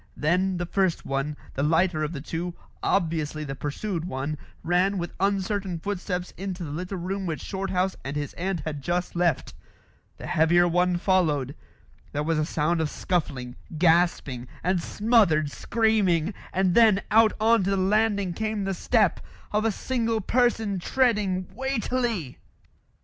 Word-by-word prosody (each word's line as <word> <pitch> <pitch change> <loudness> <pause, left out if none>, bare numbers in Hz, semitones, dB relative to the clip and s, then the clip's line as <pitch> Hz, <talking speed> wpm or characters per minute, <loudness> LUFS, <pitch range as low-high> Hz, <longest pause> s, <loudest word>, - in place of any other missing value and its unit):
Then 180 +5 +1
the 175 - -2
first 185 -1 0
one, 135 +2 -2 0.2
the 140 - -2
lighter 160 +2 +2
of 150 - -2
the 145 -5 -5
two, 170 +3 -4 0.3
obviously 160 -4 0
the 135 -2 -4
pursued 165 +6 -3
one, 145 -2 -3 0.3
ran 185 +3 +2
with 175 -1 -4
uncertain 195 -1 0
footsteps 180 0 -3
into 185 -1 -4
the 150 - -5
little 180 +5 -4
room 190 +2 -3
which 160 -2 -2
Shorthouse 190 -1 -1
and 135 +2 -4
his 145 -1 -3
aunt 185 -1 -2
had 150 -3 -5
just 175 +5 -2
left. 170 -5 +1 0.6
The - - -8
heavier 175 +3 +4
one 180 +1 +2
followed. 160 -8 +1 0.6
There 145 - -1
was 160 0 +1
a 155 - +1
sound 160 +2 0
of 155 - 0
scuffling, 135 -10 -2 0.2
gasping, 160 -7 +2 0.2
and 180 0 +1
smothered 195 -10 +2
screaming; 210 -6 +1 0.2
and 185 -1 +2
then 215 -3 +5
out 220 0 +6
on 225 -1 +4
to - - +1
the 195 - +1
landing 200 -1 +2
came 215 +1 -2
the 195 0 -1
step 210 0 +2 0.3
of 210 +1 +1
a 225 - +3
single 230 0 -1
person 225 -3 +1
treading 205 -5 +1
weightily. 240 - -2
180 Hz, 155 wpm, -26 LUFS, 160-200 Hz, 0.6 s, out